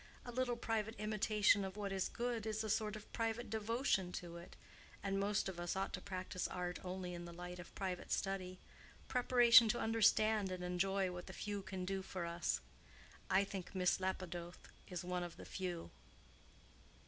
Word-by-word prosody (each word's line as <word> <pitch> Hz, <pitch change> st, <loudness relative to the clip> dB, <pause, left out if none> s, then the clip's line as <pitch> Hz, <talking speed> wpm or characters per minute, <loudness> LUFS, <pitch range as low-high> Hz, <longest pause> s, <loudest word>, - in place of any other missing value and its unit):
A 245 Hz, -, -5 dB
little 250 Hz, 0 st, 0 dB
private 225 Hz, -1 st, -1 dB
imitation 215 Hz, -1 st, +3 dB
of 190 Hz, +1 st, -5 dB
what 200 Hz, -1 st, -2 dB
is 190 Hz, -1 st, 0 dB
good 235 Hz, -2 st, -2 dB
is 220 Hz, 0 st, -1 dB
a 215 Hz, -, 0 dB
sort 215 Hz, -1 st, +1 dB
of 215 Hz, -1 st, -10 dB
private 230 Hz, 0 st, -1 dB
devotion 220 Hz, -4 st, +1 dB
to 170 Hz, -1 st, -5 dB
it, 170 Hz, -, -11 dB, 0.5 s
and 195 Hz, -1 st, 0 dB
most 200 Hz, 0 st, +1 dB
of 185 Hz, -2 st, -5 dB
us 175 Hz, +1 st, -1 dB
ought 195 Hz, 0 st, -1 dB
to -, -, -3 dB
practice 185 Hz, -2 st, -3 dB
art 180 Hz, -1 st, -3 dB
only 180 Hz, -1 st, -4 dB
in 175 Hz, 0 st, -6 dB
the 170 Hz, -, -7 dB
light 180 Hz, +1 st, -7 dB
of 175 Hz, -, -10 dB
private 185 Hz, -2 st, -3 dB
study—preparation 230 Hz, +5 st, +4 dB
to 240 Hz, -, +2 dB
understand 220 Hz, -2 st, +4 dB
and 180 Hz, -1 st, -4 dB
enjoy 190 Hz, +1 st, +1 dB
what 175 Hz, 0 st, -7 dB
the 190 Hz, -, -7 dB
few 205 Hz, 0 st, -3 dB
can 190 Hz, -1 st, -4 dB
do 195 Hz, +1 st, -1 dB
for 185 Hz, -2 st, -4 dB
us. 170 Hz, 0 st, -1 dB, 0.7 s
I 190 Hz, +1 st, +5 dB
think 195 Hz, -1 st, -6 dB
Miss 180 Hz, 0 st, +3 dB
Lapidoth 180 Hz, -2 st, -4 dB, 0.2 s
is 180 Hz, -1 st, -4 dB
one 180 Hz, 0 st, -1 dB
of 175 Hz, -1 st, -5 dB
the -, -, -9 dB
few." 180 Hz, -3 st, -4 dB
195 Hz, 180 wpm, -39 LUFS, 180-215 Hz, 0.7 s, I